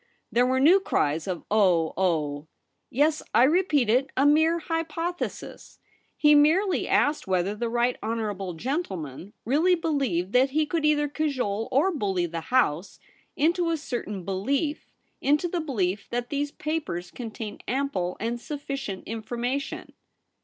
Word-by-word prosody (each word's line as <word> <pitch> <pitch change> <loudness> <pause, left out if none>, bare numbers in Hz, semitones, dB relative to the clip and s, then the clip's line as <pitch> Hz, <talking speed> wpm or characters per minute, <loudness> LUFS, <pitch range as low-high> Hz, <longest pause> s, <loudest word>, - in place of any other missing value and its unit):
There 245 +1 +3
were 260 0 +2
new 335 +8 +6
cries 155 - 0
of 180 -3 -3
* - - -48
Oh, 180 -7 +3
oh 155 -5 -1 0.2
!' - - -51
' - - -50
Yes, 300 +4 +2
I 240 - +7
repeat 300 - +3
it; 255 +5 +2
a 270 - +4
mere 315 +3 +4
hypothesis. 330 +1 -4 0.4
He 300 0 +5
merely 330 +7 +3
asked 290 -6 +2
whether 185 +1 +1
the 230 +2 -3
right 240 +1 +1
honourable 210 -5 -3
gentle 260 - -2
man 155 +5 -8
really 315 - +3
believed 270 - -1
that 260 +2 +4
he 305 +3 +1
could 320 0 -1
either 295 -1 +3
cajole 260 -8 -2
or 285 +9 +3
bully 195 - 0
the 165 -1 -4
House 200 -9 +1 0.4
into 335 +3 +2
a 330 - +1
certain 210 - -5
belief 275 - -1 0.2
— - - -45
into 295 +5 +2
the 345 0 -2
belief 205 - -2
that 240 0 -3
these 290 0 -1
papers 300 - -4
contain 225 -3 -7
ample 245 -10 -1
and 235 +2 -3
sufficient 275 -9 -5
information.' 240 +5 -4
255 Hz, 155 wpm, -26 LUFS, 200-300 Hz, 0.4 s, I